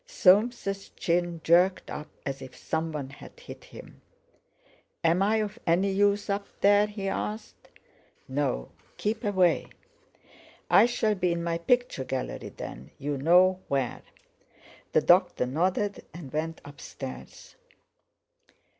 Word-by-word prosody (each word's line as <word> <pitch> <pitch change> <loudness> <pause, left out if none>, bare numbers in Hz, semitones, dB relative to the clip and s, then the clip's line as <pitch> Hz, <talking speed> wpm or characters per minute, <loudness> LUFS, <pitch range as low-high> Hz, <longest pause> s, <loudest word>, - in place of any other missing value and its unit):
Soames' 200 - +2
chin 175 -2 0
jerked 180 +3 +3
up 150 0 -6 0.2
as 135 0 -4
if 130 - -10
someone 160 -4 -3
had 140 - -13
hit - - -11
him. - - -13 1.0
"Am 170 +3 +3
I 210 +3 +3
of 215 +1 -2
any 185 +4 +3
use 205 +1 +2
up 200 0 -2
there?" 205 +1 +5
he 205 -2 -5
asked. 210 +2 -5 0.6
"No; 130 - -2 0.3
keep 220 +2 -2
away." 185 -5 +2 1.0
"I - - +7
shall 220 -3 +1
be 180 -3 0
in 170 0 -2
my 170 0 -1
picture 245 - +1
gallery, 130 0 -4
then; 65 +2 -9
you 145 +1 -3
know 180 +6 +4
where." 135 -3 -1 0.9
The - - +4
doctor - - +4
nodded, 185 +9 -1
and 150 -6 -9
went 160 +2 -3
upstairs. 140 -2 -9
180 Hz, 125 wpm, -27 LUFS, 150-205 Hz, 1.0 s, I